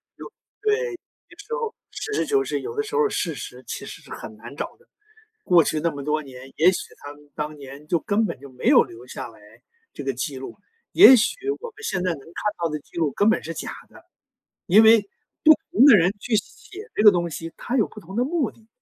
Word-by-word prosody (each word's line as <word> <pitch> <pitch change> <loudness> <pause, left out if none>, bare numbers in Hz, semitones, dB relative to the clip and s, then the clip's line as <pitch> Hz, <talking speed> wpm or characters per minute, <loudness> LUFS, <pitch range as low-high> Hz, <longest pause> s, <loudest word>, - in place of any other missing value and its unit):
有 - - -10 0.3
对， 425 0 +2 0.2
有 - - -7
些 350 - -21
时 460 - -6
候 465 -2 -3 0.2
实 425 - -5
事 - - 0
求 415 -2 +2
是， - - -3
有 455 +2 -6
的 430 - +1
时 430 +1 -6
候 455 -1 +3
事 165 -5 -2
实 125 -1 -9
其 - - -6
实 - - -10
是 - - -17
很 110 - -8
难 120 +5 -11
找 - - -5
的。 475 - -28 0.6
过 170 -4 +5
去 155 - -1
那 170 +2 +1
么 140 -2 -7
多 155 +1 0
年， 130 -1 -12
也 175 +3 +6
许 185 - -2 0.2
他 145 0 -8
们 145 0 -20
当 150 0 -4
年 140 +2 -11
就 170 - +2
根 205 +6 0
本 210 - -4
就 140 - -11
没 125 - -7
有 - - +7
留 115 +1 -13
下 - - -7
来 110 - -17 0.5
这 - - -8
个 135 -1 -1
记 135 +2 -4
录， 130 - -8 0.4
也 305 -8 +9
许 220 - +1 0.3
我 475 - -7
们 440 0 -16
现 190 - -2
在 180 - +1
能 140 - -7
看 190 +8 -4
到 170 - +2
的 150 -1 -3
记 145 - -20
录 160 -3 +1
根 205 - +2
本 220 - +2
是 165 - -5
假 165 - -6 0.2
的。 - - -18 0.6
因 205 +5 +6
为 220 -1 +7 0.4
不 315 - +9 0.2
同 245 - +6
的 290 - +9
人 180 +2 +4
去 230 +2 -1
写 405 - -6
这 - - +1
个 210 - +10
东 175 -2 -1
西， 165 +1 -7
它 250 - -2
有 220 - +2
不 - - -12
同 190 +4 -11
的 245 - +2
目 300 -5 -1
的。 220 - -24
180 Hz, 270 characters per minute, -23 LUFS, -, 0.6 s, 个